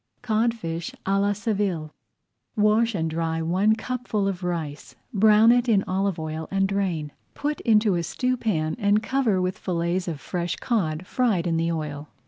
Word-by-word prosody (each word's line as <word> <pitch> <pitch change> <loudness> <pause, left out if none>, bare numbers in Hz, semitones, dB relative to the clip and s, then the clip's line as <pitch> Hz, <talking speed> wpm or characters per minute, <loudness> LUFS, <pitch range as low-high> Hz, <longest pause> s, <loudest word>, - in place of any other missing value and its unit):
CODFISH 215 -8 -1
À 195 +1 +2
LA 200 0 +2
SEVILLE 195 -7 -2 0.6
Wash 215 +1 +3
and 165 -3 0
dry 160 0 -1
one 185 +7 +2
cupful 225 -3 -2
of 190 -2 -3
rice, 155 -6 -4 0.2
brown 215 +2 +6
it 245 0 +2
in 200 -3 +4
olive 190 0 -1
oil, 155 0 -4
and 195 0 +1
drain. 185 -7 -1 0.2
Put 295 0 -2
into 215 -3 +3
a 175 - 0
stewpan 215 -6 -1
and 205 0 +2
cover 240 -7 +1
with 185 0 -2
fillets 175 0 -1
of 160 -4 -3
fresh 175 +1 -3
cod, 180 -8 -1
fried 215 -6 +1
in 165 -2 +1
the 165 +1 0
oil. 150 -2 -4
195 Hz, 160 wpm, -25 LUFS, 165-215 Hz, 0.6 s, brown